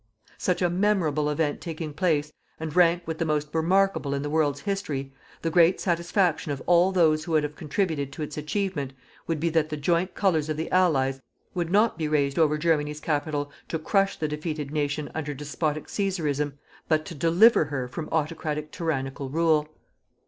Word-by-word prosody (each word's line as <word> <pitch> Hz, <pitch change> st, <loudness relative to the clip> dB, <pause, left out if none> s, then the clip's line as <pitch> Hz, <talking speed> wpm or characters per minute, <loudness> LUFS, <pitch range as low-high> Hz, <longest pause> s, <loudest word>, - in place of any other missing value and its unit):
Such 180 Hz, 0 st, 0 dB
a 175 Hz, -, +3 dB
memorable 175 Hz, -6 st, +1 dB
event 150 Hz, 0 st, -1 dB
taking 160 Hz, -2 st, -5 dB
place, 150 Hz, -2 st, 0 dB, 0.3 s
and 160 Hz, -1 st, -5 dB
rank 175 Hz, -1 st, +4 dB
with 160 Hz, -1 st, -4 dB
the -, -, +2 dB
most 150 Hz, -1 st, 0 dB
remarkable 170 Hz, -3 st, +2 dB
in 140 Hz, -, -2 dB
the 145 Hz, -, -3 dB
world's 145 Hz, -3 st, +1 dB
history, 155 Hz, -10 st, -3 dB, 0.3 s
the 165 Hz, -, 0 dB
great 175 Hz, +1 st, +5 dB
satisfaction 170 Hz, -2 st, +1 dB
of 140 Hz, -, -3 dB
all 175 Hz, +2 st, +4 dB
those 160 Hz, -4 st, +3 dB
who 170 Hz, -, -4 dB
would 155 Hz, -1 st, +4 dB
have 150 Hz, 0 st, -4 dB
contributed 150 Hz, -3 st, -2 dB
to 155 Hz, -, -5 dB
its 150 Hz, -, -6 dB
achievement, 150 Hz, -3 st, -2 dB, 0.3 s
would 165 Hz, -2 st, -1 dB
be 170 Hz, +2 st, +1 dB
that 155 Hz, -1 st, +1 dB
the 155 Hz, -, -3 dB
joint 170 Hz, +5 st, 0 dB
Colours 160 Hz, -6 st, +1 dB
of 155 Hz, -, -2 dB
the 160 Hz, -, -4 dB
Allies 135 Hz, -8 st, +2 dB, 0.3 s
would 175 Hz, -2 st, -2 dB
not 210 Hz, -1 st, +3 dB
be 155 Hz, -, 0 dB
raised 145 Hz, -1 st, +1 dB
over 150 Hz, -2 st, +3 dB
Germany's 150 Hz, -2 st, 0 dB
capital 145 Hz, -1 st, -2 dB, 0.2 s
to 160 Hz, -, -2 dB
crush 195 Hz, +5 st, +1 dB
the 155 Hz, -, -1 dB
defeated 150 Hz, -1 st, -4 dB
nation 145 Hz, 0 st, -2 dB
under 150 Hz, -2 st, -3 dB
despotic 150 Hz, +1 st, -2 dB
cæsarism, 150 Hz, -8 st, -1 dB, 0.4 s
but 155 Hz, -1 st, +2 dB
to -, -, -7 dB
deliver 170 Hz, -, +5 dB
her 135 Hz, -3 st, -3 dB
from 155 Hz, +5 st, -6 dB
autocratic 155 Hz, -1 st, -2 dB
tyrannical 135 Hz, -5 st, -3 dB
rule. 155 Hz, 0 st, +2 dB
155 Hz, 180 wpm, -26 LUFS, 150-170 Hz, 0.4 s, great